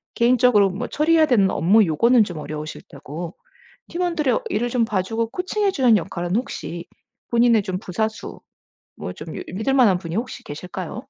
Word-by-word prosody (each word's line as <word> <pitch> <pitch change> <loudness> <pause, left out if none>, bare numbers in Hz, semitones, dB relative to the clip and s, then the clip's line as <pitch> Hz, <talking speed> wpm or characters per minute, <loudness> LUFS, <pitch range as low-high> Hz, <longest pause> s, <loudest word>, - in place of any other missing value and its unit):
개인적으로 235 -4 +4
뭐 215 +7 -4
처리해야 315 +1 +3
되는 200 -7 +3
업무 205 +7 +4
요거는 230 +9 +4
좀 175 -5 -7
어려우실 150 +1 -6
테고 160 +5 -8 0.5
팀원들의 335 -7 0
일을 235 +4 -1
좀 235 -1 +1
봐 210 -4 0
주고 225 +3 -2
코칭해 390 +2 -1
주는 250 -9 +4
역할은 175 0 -3
혹시 175 -7 -4 0.5
본인의 235 -2 +4
좀 185 -1 -3
부사수 220 +3 -4 0.6
뭐 90 - -6
좀 155 0 -9
이 - - -5
믿을 220 +8 -1
만한 225 -9 +5
분이 165 -2 -7
혹시 245 +3 -4
계실까요? 180 +5 -7
220 Hz, 355 characters per minute, -22 LUFS, 175-250 Hz, 0.6 s, 만한